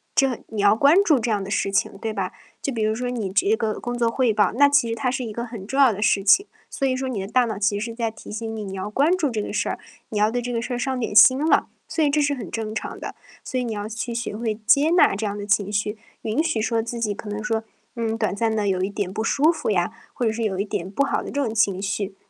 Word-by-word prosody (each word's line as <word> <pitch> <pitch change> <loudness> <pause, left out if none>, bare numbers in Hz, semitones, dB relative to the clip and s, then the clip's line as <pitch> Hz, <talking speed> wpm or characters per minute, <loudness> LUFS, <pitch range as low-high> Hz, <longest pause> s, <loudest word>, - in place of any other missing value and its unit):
这 270 -4 +2
你 215 -2 -3
要 205 +1 +6
关 280 +7 +5
注 300 -9 +4
这 230 +1 -2
样 205 -2 0
的 200 - -7
事 195 - 0
情， 195 - 0
对 225 -1 -3
吧？ 195 -3 -3 0.3
就 275 - -3
比 225 - -2
如 215 0 +2
说 245 +2 -3
你 220 -6 -3
这 200 +2 +3
个 220 -2 -2
工 245 0 -4
作 235 -1 +2
汇 240 -2 +1
报， 205 -3 +3
那 285 +5 +5
其 285 -5 +3
实 230 - -1
它 250 +3 -1
是 255 0 -2
一 220 - -5
个 235 +3 -4
很 225 -5 -8
重 270 +6 -2
要 260 -5 +6
的 205 - -6
事 200 -1 +3
情。 345 - +5 0.2
所 275 - -2
以 260 -1 +1
说 265 0 -3
你 220 -7 -3
的 - - -4
大 250 +3 +3
脑 220 -3 -4
其 205 0 +1
实 215 - -2
是 230 - -10
在 230 -2 -1
提 220 - -13
醒 225 +1 -4
你， 210 - -5
你 195 - -6
要 195 +2 -4
关 295 +11 +3
注 310 -7 0
这 220 -3 -2
个 - - -5
事 - - 0
儿， - - -4 0.3
你 210 - -2
要 210 +1 +4
对 245 +1 -1
这 245 +1 -4
个 230 -1 -1
事 250 - -4
儿 - - -1
上 260 0 -2
点 225 -3 -3
心 260 +4 +8
了， - - +3 0.2
所 325 -1 0
以 290 - +3
这 300 +1 +2
是 285 0 +1
很 225 -10 -7
正 220 -1 -4
常 - - -5
的。 - - -6 0.3
所 255 - -4
以 250 - 0
你 235 - -3
要 205 0 -4
去 230 +2 -4
学 230 -2 -3
会 220 -1 -3
接 285 +6 +5
纳 345 - +5
这 215 - -3
样 205 0 -3
的 205 - -5
情 205 -1 +1
绪， 210 +1 -1 0.3
允 225 +9 0
许 315 -9 0
说 225 0 +1
自 235 +1 -5
己 215 -3 0
可 210 +1 -8
能 210 +1 -4
说， 220 +1 -1 0.3
嗯， 225 -1 -2
短 215 -3 -1
暂 225 +1 0
地 210 -2 0
有 185 -1 +1
一 195 - 0
点 200 -2 -3
不 220 - -2
舒 290 +7 +3
服 330 - -1
呀， 190 +1 +1 0.2
或 245 - -2
者 220 - +2
是 230 0 -3
有 190 -3 -1
一 200 - 0
点 185 -2 -4
不 280 +7 +1
好 - - -1
的 - - -7
这 285 - -1
种 225 -5 -2
情 200 -3 +2
绪。 200 -1 -3
225 Hz, 330 characters per minute, -23 LUFS, 205-250 Hz, 0.3 s, 心